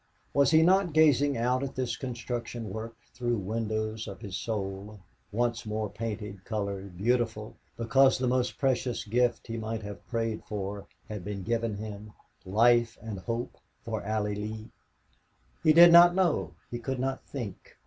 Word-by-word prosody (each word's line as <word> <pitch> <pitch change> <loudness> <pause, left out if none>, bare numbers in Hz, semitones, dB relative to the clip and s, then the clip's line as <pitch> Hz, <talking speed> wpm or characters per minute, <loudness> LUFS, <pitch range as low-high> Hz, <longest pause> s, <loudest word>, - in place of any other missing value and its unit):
Was 140 -2 +4
he 160 +1 +6
not 185 -1 +4
gazing 145 -3 +4
out 125 +2 +1
at 140 -1 -4
this 125 -3 -1
construction 120 -3 -5
work 110 +2 -6 0.2
through 120 -1 -1
windows 110 +1 -2
of 95 -2 -8
his 95 -2 -6
soul, 100 -1 -4 0.3
once 120 +2 0
more 110 -1 -3
painted, 105 -3 -5
colored, 100 -4 -4
beautiful, 115 0 0 0.2
because 130 +4 +4
the 130 - -1
most 125 0 0
precious 130 -2 0
gift 120 +2 +1
he 115 0 -5
might 110 0 -4
have 105 -1 -9
prayed 115 -2 -2
for 100 -1 -5 0.2
had 105 -4 -6
been 100 0 -5
given 115 0 -1
him 105 0 -8 0.3
life 115 +3 +4
and 110 -4 -5
hope 115 +4 -4 0.3
for - - -3
Allie 105 0 -1
Lee? 110 +1 -6 0.9
He 155 - +6
did 170 +2 +9
not 175 +1 +8
know. 185 -4 +1 0.2
He 120 - -3
could 130 +3 -3
not 135 +1 -2
think. 120 -8 -8
115 Hz, 160 wpm, -29 LUFS, 105-125 Hz, 0.9 s, did